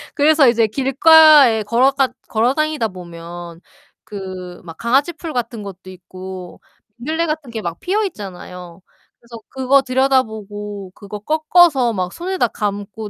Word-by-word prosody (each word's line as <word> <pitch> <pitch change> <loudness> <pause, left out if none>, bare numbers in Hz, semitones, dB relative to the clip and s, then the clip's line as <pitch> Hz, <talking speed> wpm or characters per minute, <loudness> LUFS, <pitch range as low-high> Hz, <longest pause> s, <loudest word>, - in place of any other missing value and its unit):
그래서 295 -1 +4
이제 230 -2 +2
길가에 275 -1 +5
걸어가 260 +5 +2 0.2
걸어 235 +4 +1
다니다 310 -6 -1
보면 170 -1 -10 0.4
그 185 -4 -8
막 165 -2 -11
강아지 270 +8 +1
풀 325 -1 -8
같은 230 -3 -4
것도 190 -1 -10
있고 185 0 -10 0.4
민들레 315 +7 -2
같은 305 -4 -4
게 225 -1 -5
막 170 -1 -5
피어있잖아요. 190 - -5 0.4
그래서 235 -1 -13
그거 265 +1 +2
들여다보고 220 -7 -2
그거 205 0 -9
꺾어서 310 - +3
막 185 -2 -3
손에다 365 -5 -1
감고 205 +1 -5
230 Hz, 295 characters per minute, -18 LUFS, 190-275 Hz, 0.4 s, 길가에